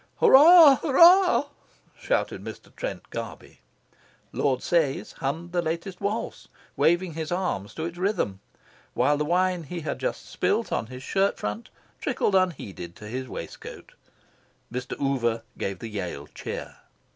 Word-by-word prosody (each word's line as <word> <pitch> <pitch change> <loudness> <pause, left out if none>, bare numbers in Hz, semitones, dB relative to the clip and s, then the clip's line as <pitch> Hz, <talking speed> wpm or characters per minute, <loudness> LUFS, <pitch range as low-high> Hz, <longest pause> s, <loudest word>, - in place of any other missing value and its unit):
"Hurrah, 300 0 +8
hurrah!" 345 +2 +6 0.5
shouted - - -2
Mr. - - -10
Trent - - -6
Garby. - - -8 0.7
Lord 130 -3 0
Sayes 160 -6 0
hummed 160 +6 -3
the 175 -1 +1
latest 170 +3 -4
waltz, 205 +3 -3 0.3
waving 175 +1 +2
his 160 +1 -5
arms 175 - -2
to 160 - -3
its 170 +1 -6
rhythm, 180 - -1 0.6
while 145 - +3
the 150 - -1
wine 180 +2 +1
he 170 +3 -6
had 150 - -4
just - - -3
spilt - - -1
on 115 - -1
his 130 +2 -9
shirt 195 +5 +1
front 105 +2 -5 0.3
trickled 205 - -1
unheeded 105 - -1
to 105 - -11
his 130 +4 -5
waistcoat. - - -9 0.8
Mr. 125 0 -5
Oover 120 -5 0 0.2
gave 95 -1 -3
the 115 - -7
Yale 90 -9 -5
cheer. - - -7
165 Hz, 140 wpm, -26 LUFS, 125-190 Hz, 0.8 s, Hurrah